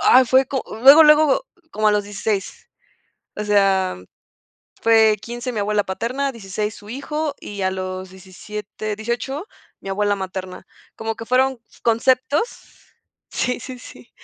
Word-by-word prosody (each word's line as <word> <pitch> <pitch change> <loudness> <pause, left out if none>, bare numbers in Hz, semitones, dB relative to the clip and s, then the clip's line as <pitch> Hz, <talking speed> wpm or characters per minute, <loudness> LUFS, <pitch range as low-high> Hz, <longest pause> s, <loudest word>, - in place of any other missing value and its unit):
ah, 255 - +7
fue 260 +2 +4
co 265 0 -2 0.2
luego 280 +5 +10
luego 300 - +5 0.3
como 215 0 +2
a 210 - +3
los 205 -1 +1
16. 205 -1 -4 0.7
O 210 - -3
sea, 195 -2 +2 0.8
fue 220 -1 +5
15 240 +3 -5
mi 225 - -4
abuela 205 0 +1
paterna, 235 +9 -2
16 210 -2 -4
su 205 - -14
hijo, 290 +4 -3
y 200 -1 -6
a 190 - +1
los 185 0 -5
17 210 +3 -7
18 240 - -4 0.3
mi - - -9
abuela 205 +1 +1
materna. 185 -1 -6 0.3
Como 225 0 -4
que 230 - -7
fueron 255 0 +2 0.2
conceptos 255 - 0 0.5
Sí, 250 -1 -1
sí, 255 -1 -8
sí. 245 -1 -14
220 Hz, 145 wpm, -21 LUFS, 200-255 Hz, 0.8 s, luego